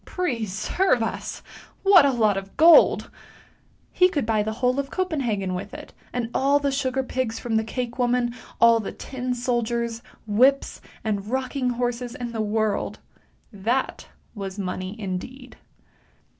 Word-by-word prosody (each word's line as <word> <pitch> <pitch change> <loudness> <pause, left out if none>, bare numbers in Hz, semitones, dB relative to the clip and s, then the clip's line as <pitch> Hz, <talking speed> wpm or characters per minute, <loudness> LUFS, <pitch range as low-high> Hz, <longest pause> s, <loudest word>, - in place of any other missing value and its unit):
Preserve 245 - 0
us! 225 - -5 0.4
What 385 -7 +7
a - - +3
lot 220 -5 +2
of 195 0 -7
gold! 330 +1 +6 0.8
He 365 0 +4
could 290 -9 -1
buy 220 -1 +1
the 220 +1 -2
whole 250 +3 0
of 275 -1 -3
Copenhagen 250 - -1
with 180 - -6
it, - - -10 0.2
and 240 -2 -3
all 280 +2 +3
the 285 -1 0
sugar 265 -1 -1
pigs 255 -3 -2
from 235 -2 -3
the 220 - +2
cake 240 +2 -5
woman, 245 -1 +1 0.3
all 230 0 +6
the 215 - -5
tin 250 -1 -4
soldiers, 235 -1 -1 0.2
whips, 255 +6 +2 0.2
and 205 -2 -2
rock 260 +2 -2
ing 255 -3 0
horses 245 0 -2
in 240 -1 -5
the 225 -1 -2
world! 215 -1 -1 0.6
That 230 +7 -2 0.3
was 195 -3 -6
money 185 +1 -4
indeed! 220 +7 -6
240 Hz, 150 wpm, -24 LUFS, 220-265 Hz, 0.8 s, What